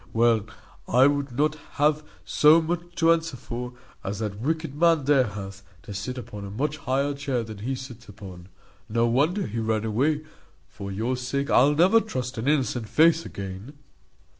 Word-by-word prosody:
Well, 115 -2 +3 0.4
I 125 +2 +5
would 140 -1 +1
not 150 +1 +2 0.2
have 150 +1 +2 0.2
so 150 +2 +6
much 175 +1 -4
to 165 -1 +4
answer 165 -4 -3
for, 125 +1 -6 0.3
as 100 +1 -3
that 105 -2 -4
wicked 160 +1 -2
man 165 -1 +3
there 135 -3 +4
hath, 100 -1 -8 0.2
to 100 - -8
sit 115 +6 -5
upon 105 -4 -7
a 100 - -6
much 145 +9 -2
higher 140 +1 0
chair 140 -4 -2
than 110 -2 -9
he 130 +6 -2
sits 130 -4 -10
upon. 95 -3 -11 0.4
No 115 +2 +2
wonder 150 - +1
he 115 +2 -4
ran 110 -1 0
away; 145 +8 +1 0.4
for 100 0 -8
your 115 +6 -1
sake 130 +3 -2
I'll 145 +4 +5
never 185 +8 +5
trust 125 - -4
an 115 - -3
innocent 130 -6 0
face 165 +5 +4
again." 100 +7 -7
130 Hz, 175 wpm, -25 LUFS, 110-150 Hz, 0.4 s, so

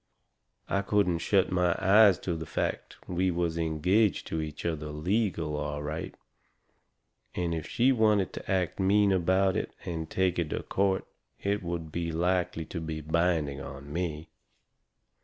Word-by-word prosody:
I 100 - +1
couldn't 100 -4 +1
shut 95 +2 +2
my 90 -1 +2
eyes 100 0 +6
to 85 - -2
the 80 -1 -6
fact - - -3
we 90 +1 +1
was 85 -1 -1
engaged 85 +6 +1
to 80 - -1
each 75 -1 -6
other 80 -3 -2
legal, 80 +1 -1
all 75 0 -3
right. 75 +2 -5 1.2
And 85 -2 -1
if 80 -2 -4
she 125 +3 +3
wanted 105 -6 +2
to - - -6
act 95 -1 0
mean 100 +1 +4
about 95 +1 +2
it - - -3
and 80 -2 -4
take 95 -2 +1
it 80 -3 -1
to - - -2
a - - -17
court 95 -1 0 0.3
it 100 +1 -1
would 85 -3 -5
likely 85 0 0
be 80 -2 -5
binding 80 -3 0
on 70 +1 -8
me. 80 -2 -3
85 Hz, 155 wpm, -29 LUFS, 80-95 Hz, 1.2 s, eyes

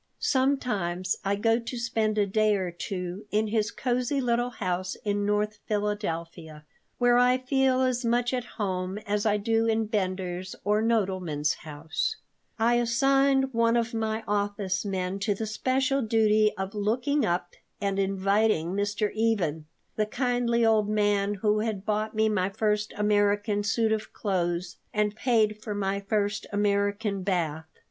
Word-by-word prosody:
Sometimes 210 -10 0
I 200 +1 +1
go 225 +3 +2
to 235 +1 -6
spend 225 -2 0
a 205 - +3
day 215 +1 +2
or 185 -3 -2
two 180 +3 -5
in 215 +1 +1
his 215 0 +1
cozy 250 +3 -1
little 240 -1 +1
house 185 -5 -3
in 205 0 0
North 210 0 0
Philadelphia, 170 -7 -3 0.3
where 245 0 +4
I 250 +1 +4
feel 260 0 +2
as 255 -1 0
much 240 +1 +1
at 250 -1 -1
home 185 -2 -2
as 205 +1 0
I 210 0 +3
do 225 +2 +1
in 225 0 +1
Bender's 185 -3 -3
or 210 +2 +2
Nodelman's 185 -9 0
house 155 0 -3 0.4
I 235 +1 +3
assigned 270 +2 +2
one 230 0 +3
of 235 +1 -1
my 220 0 -2
office 205 -2 -1
men 190 -1 -2
to 200 0 0
the 220 - -3
special 265 +5 0
duty 215 -2 +3
of 190 +1 -4
looking 240 +8 0
up 175 -2 -1 0.3
and 200 -1 -1
inviting 195 -2 +1
Mr. 205 +1 -1
Even, 185 -9 0 0.3
the 215 -1 +1
kindly 245 -1 +1
old 215 -2 +3
man 205 -1 +1
who 210 +1 +1
had 210 -3 -3
bought 215 +1 -1
me 220 0 +3
my 195 -3 +1
first 210 +1 0
American 205 0 +2
suit 220 +1 +1
of 220 0 -2
clothes 175 -3 -2 0.2
and 210 0 +1
paid 215 -3 +1
for 210 -2 -4
my 200 0 -1
first 205 +1 -1
American 205 0 0
bath. 165 -5 -1
210 Hz, 155 wpm, -27 LUFS, 195-230 Hz, 0.4 s, where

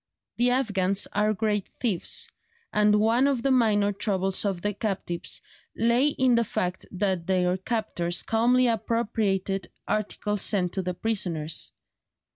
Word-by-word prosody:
The 245 +1 +3
Afghans 205 -6 +1
are 210 +1 +2
great 210 -1 -1
thieves, 215 -9 -1 0.5
and 210 0 +4
one 230 +5 +3
of 270 -4 0
the 275 - +2
minor 215 -5 +3
troubles 195 -2 0
of 190 -4 -2
the 205 0 0
captives 195 -5 -3 0.3
lay 235 +5 +3
in 260 -4 +2
the 235 0 +4
fact 180 -4 -3
that 185 -3 -1
their 180 -1 +2
captors 190 -4 -2
calmly 245 +3 +3
appropriated 210 -5 -1 0.2
articles 210 -1 -2
sent 180 -5 +1
to 190 - -1
the 180 -1 -3
prisoners. 175 -8 -2
205 Hz, 135 wpm, -26 LUFS, 190-230 Hz, 0.5 s, and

